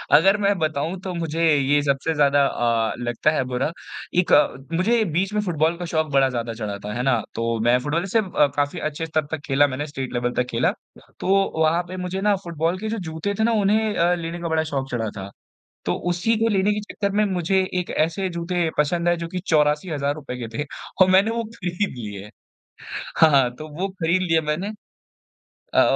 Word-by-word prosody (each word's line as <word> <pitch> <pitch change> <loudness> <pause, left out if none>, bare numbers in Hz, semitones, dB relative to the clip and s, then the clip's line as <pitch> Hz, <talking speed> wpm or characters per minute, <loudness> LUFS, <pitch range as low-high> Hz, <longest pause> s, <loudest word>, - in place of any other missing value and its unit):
अगर 195 +7 +5
मैं 200 -1 +2
बताऊँ, 155 +3 -1
तो 185 -1 -4
मुझे 165 -1 -2
ये 145 +1 +3
सबसे 140 +3 0
ज़्यादा 145 -2 +4
अ, 115 -4 +1
लगता 120 +5 +1
है 155 -4 0
बुरा। 125 +5 -1 0.5
एक 180 - +1 0.4
मुझे 220 +7 +2
बीच 190 +5 0
में 210 - +1
फुटबॉल 165 -3 0
का 175 - -5
शौक 160 -2 0
बड़ा 135 -1 +4
ज़्यादा 120 -2 -3
चढ़ा 105 -3 -4
था, 105 +1 -6
है 120 - -2
ना? 125 -5 +2
तो 115 0 -1
मैं 120 +2 +4
फुटबॉल 150 +7 -1
से 225 - +5
अ, 180 -8 +2
काफ़ी 145 +4 0
अच्छे 155 +1 -3
स्तर 155 -1 -1
तक 160 - -2
खेला 145 +1 +4
मैंने, 145 +2 -4
स्टेट 135 -3 -5
लेवल 120 0 0
तक 125 - 0
खेला, 115 +1 +2 0.5
तो 195 - +2 0.2
वहाँ 160 +2 +3
पे 185 +2 -7
मुझे 180 +1 -3
ना 205 0 +3
फुटबॉल 170 +1 -1
के 215 +2 -3
जो 225 - -2
जूते 160 +6 -3
थे - - +3
ना 230 - +3
उन्हें 215 +2 +2
अ, 170 +1 +3
लेने 170 0 -5
का 170 - -3
बड़ा 160 0 +1
शौक 135 -1 -2
चढ़ा 115 -3 -1
था। 95 0 -6 0.6
तो - - 0 0.2
उसी 180 +6 +1
को 225 +1 +2
लेने 200 -1 +2
के 210 - -2
चक्कर 200 -1 -1
में 210 - +4
मुझे 190 -1 +1 0.2
एक 180 - -6
ऐसे 165 +5 0
जूते 170 0 -1
पसंद 170 +4 +1
आए 175 - +3
जो 170 0 -4
कि 180 - -4
₹84,000 150 -3 0
के 120 -2 -5
थे 150 - 0 0.4
और 185 - +5
मैंने 195 +4 +5
वो 230 0 -1
खरीद 205 -3 -3
लिए 105 -2 -7 0.9
हाँ, 140 -6 +5
तो 155 +4 -9
वो 195 +2 0
खरीद 185 -1 0
लिया 165 -3 +2
मैंने 155 +7 -2 1.0
अ, - - +6
160 Hz, 205 wpm, -23 LUFS, 140-185 Hz, 1.0 s, अ